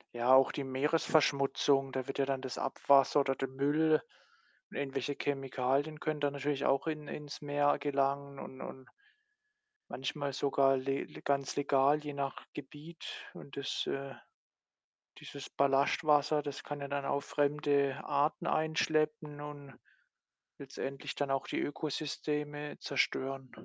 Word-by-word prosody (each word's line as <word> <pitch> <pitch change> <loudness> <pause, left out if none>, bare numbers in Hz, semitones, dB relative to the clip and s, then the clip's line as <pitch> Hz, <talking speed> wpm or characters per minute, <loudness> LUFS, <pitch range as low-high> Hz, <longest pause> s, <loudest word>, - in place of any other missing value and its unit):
Ja, 120 +2 +2
auch 130 0 +7
die 140 - -3
Meeresverschmutzung. 140 -1 +2
Da 130 -1 -2
wird - - -5
ja 135 - +3
dann 135 -1 -1
das 130 -2 -5
Abwasser, 140 +1 +4
oder 135 -1 0
der 135 - -2
Müll 150 +4 +3 0.7
und - - -8
irgendwelche 135 0 -2
Chemikalien 135 +2 0
können 155 -1 -2
da 145 0 +2
natürlich 140 0 -1
auch 135 +2 +2
in 155 -2 -3
ins 145 0 -7
Meer 145 0 +2
gelangen 140 0 0
und 130 0 -8
und 130 0 -8 1.0
manchmal 140 +1 -3
sogar 135 -1 +3
le 135 +1 -1
le - - -12
ganz 140 -2 0
legal, 140 +1 +4
je 145 - -4
nach 140 -1 -4
Gebiet 150 +4 -10 0.3
und 140 - -11
das, 140 - -2
äh 135 0 -3 1.1
dieses 140 -1 -8
Ballastwasser, 145 +2 +3
das 145 -1 -5
kann 145 -1 -5
ja 140 - -3
dann 140 0 -2
auch 140 - 0
fremde 145 -1 +1
Arten 145 +2 +1
einschleppen 155 -1 +1
und 145 -2 -8 0.9
letztendlich 135 0 -5
dann 145 -1 -1
auch 135 0 0
die - - -1
Ökosysteme 150 0 -3
zerstören. 135 -1 -1
140 Hz, 140 wpm, -33 LUFS, 135-145 Hz, 1.1 s, auch